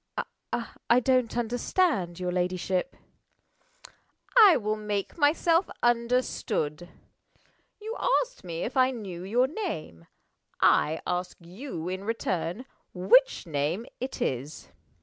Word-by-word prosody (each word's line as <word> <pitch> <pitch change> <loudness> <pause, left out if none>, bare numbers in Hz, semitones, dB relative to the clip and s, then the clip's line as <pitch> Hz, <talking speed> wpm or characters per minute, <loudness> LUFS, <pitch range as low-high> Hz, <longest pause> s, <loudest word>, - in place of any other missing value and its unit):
"I 235 - +6
don't 255 -2 +1
understand 240 - 0
your 180 -1 -2
ladyship." 180 +4 -1 1.4
"I 420 -8 +8
will 215 -1 -1
make 210 -2 -3
myself 330 +3 +3
understood. 235 -9 0 0.9
You 440 +2 -5 0.3
asked - - -16
me 170 -2 -4
if 250 - -4
I 260 -1 +5
knew 200 -9 -6
your 235 +7 +2
name. 265 - -5 0.5
I 160 +2 +3
ask 180 +1 -2
you, 175 - -7
in 185 +1 -4
return, 200 -1 -2 0.3
which 220 +10 +4
name 160 +7 -1
it 260 +2 -3
is? 135 +4 -4
215 Hz, 110 wpm, -27 LUFS, 175-255 Hz, 1.4 s, I